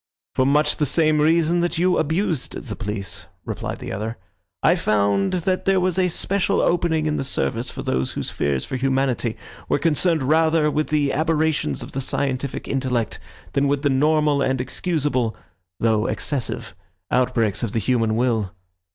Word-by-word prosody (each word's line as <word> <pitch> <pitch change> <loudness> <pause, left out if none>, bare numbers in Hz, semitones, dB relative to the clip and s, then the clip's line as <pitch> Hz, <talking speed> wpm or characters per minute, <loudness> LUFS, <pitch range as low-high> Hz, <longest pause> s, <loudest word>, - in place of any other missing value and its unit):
"For 130 - +2
much 150 +2 +3
the 150 - +1
same 155 +1 +3
reason 165 +2 +3
that 175 -1 0
you 180 +2 +3
abused 160 -2 -1
the 110 -6 -6
police," 100 -5 -4 0.2
replied - - -4
the - - -7
other. 110 +4 -4 0.5
"I - - +6
found 100 -2 +1
that 185 -1 0
there 195 -1 +3
was 185 0 +1
a 185 - +3
special 190 +3 0
opening 165 -2 +1
in 150 -1 0
the - - -1
service 125 -2 -1
for - - -6
those 65 0 -1
whose - - -3
fears 70 -2 -1
for 130 - -3
humanity 130 -3 0 0.3
were - - +3
concerned 160 +1 +1
rather 160 +1 +3
with 155 +1 0
the 145 -2 +1
aberrations 155 - 0
of - - -9
the 135 - -3
scientific 135 0 -2
intellect 130 -4 -1 0.3
than 140 +1 +2
with 140 +1 0
the 145 - +3
normal 150 +1 +3
and 130 -1 +1
excusable, 130 -4 -1 0.4
though 110 -1 +2
excessive, 140 -5 -3 0.4
outbreaks 120 -5 +1
of 115 -4 -2
the - - 0
human 115 0 +1
will. 110 -5 0
140 Hz, 170 wpm, -22 LUFS, 115-160 Hz, 0.5 s, I